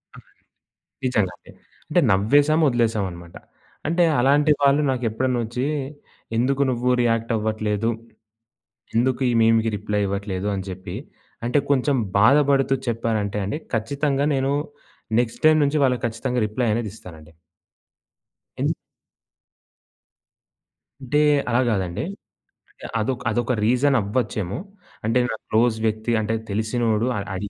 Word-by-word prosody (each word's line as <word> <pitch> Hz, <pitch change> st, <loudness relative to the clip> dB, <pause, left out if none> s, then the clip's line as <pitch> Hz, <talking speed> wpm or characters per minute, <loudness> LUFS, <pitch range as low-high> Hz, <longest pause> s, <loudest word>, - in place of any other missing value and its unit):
అలాగే. -, -, -17 dB, 0.7 s
నిజంగాండి. 105 Hz, -8 st, -1 dB, 0.4 s
అంటే -, -, +3 dB
నవ్వేసాం 145 Hz, +11 st, +3 dB
వదిలేసాం 115 Hz, -4 st, +1 dB
అన్నమాట. 85 Hz, 0 st, -12 dB, 0.5 s
అంటే 170 Hz, +2 st, +2 dB, 0.2 s
అలాంటి 145 Hz, +4 st, +4 dB
వాళ్ళు 140 Hz, +1 st, +4 dB
నాకెప్పుడనొచ్చి 125 Hz, 0 st, -1 dB, 0.7 s
ఎందుకు 135 Hz, +4 st, +1 dB
నువ్వు 125 Hz, 0 st, 0 dB
రియాక్టవ్వట్లేదు? 110 Hz, -2 st, 0 dB, 1.1 s
ఎందుకు 130 Hz, +3 st, +1 dB
ఈ -, -, +2 dB
మీమ్‌కి 115 Hz, 0 st, +3 dB
రిప్లై 105 Hz, 0 st, -2 dB
ఇవ్వట్లేదు. 100 Hz, 0 st, -3 dB
అని 95 Hz, -1 st, -3 dB
జెప్పి. 95 Hz, 0 st, -7 dB, 0.5 s
అంటే 125 Hz, +5 st, +2 dB
కొంచెం 140 Hz, 0 st, +2 dB, 0.2 s
బాధపడుతూ 135 Hz, +4 st, +4 dB
చెప్పారంటే 110 Hz, -3 st, -1 dB
అండి. 105 Hz, +10 st, -3 dB, 0.2 s
ఖచ్చితంగా 140 Hz, +5 st, 0 dB
నేను 135 Hz, +1 st, 0 dB, 0.7 s
నెక్స్ట్ 120 Hz, -2 st, -2 dB
టైమ్ 155 Hz, 0 st, +6 dB
నుంచి 145 Hz, +2 st, +1 dB
వాళ్ళకి 125 Hz, -2 st, +1 dB
ఖచ్చితంగా 125 Hz, +2 st, -2 dB
రిప్లై 115 Hz, +3 st, -1 dB
అనేది 115 Hz, -1 st, -2 dB
ఇస్తానండి. 80 Hz, -7 st, -13 dB, 1.3 s
ఎం -, -, +2 dB, 2.3 s
అంటే, 135 Hz, +3 st, 0 dB, 0.3 s
అలా 120 Hz, -, +2 dB
గాదండి. 95 Hz, -5 st, -1 dB, 0.7 s
అంటే -, -, -21 dB, 0.2 s
అదొక్ 125 Hz, +3 st, -2 dB
అదొక 120 Hz, +1 st, 0 dB
రీజన్ 130 Hz, +4 st, +3 dB
అవ్వచ్చేమో! 105 Hz, -2 st, -2 dB, 0.5 s
అంటే 115 Hz, +3 st, +2 dB
నాకు 110 Hz, -, -5 dB
క్లోజ్ 115 Hz, +1 st, +3 dB
వ్యక్తి 110 Hz, +2 st, -1 dB
అంటే 110 Hz, +1 st, -1 dB, 0.2 s
తెలిసినోడు 110 Hz, +2 st, 0 dB
అడ్ 100 Hz, 0 st, -4 dB
అడి 100 Hz, +2 st, -4 dB
115 Hz, 115 wpm, -23 LUFS, 105-130 Hz, 2.3 s, టైమ్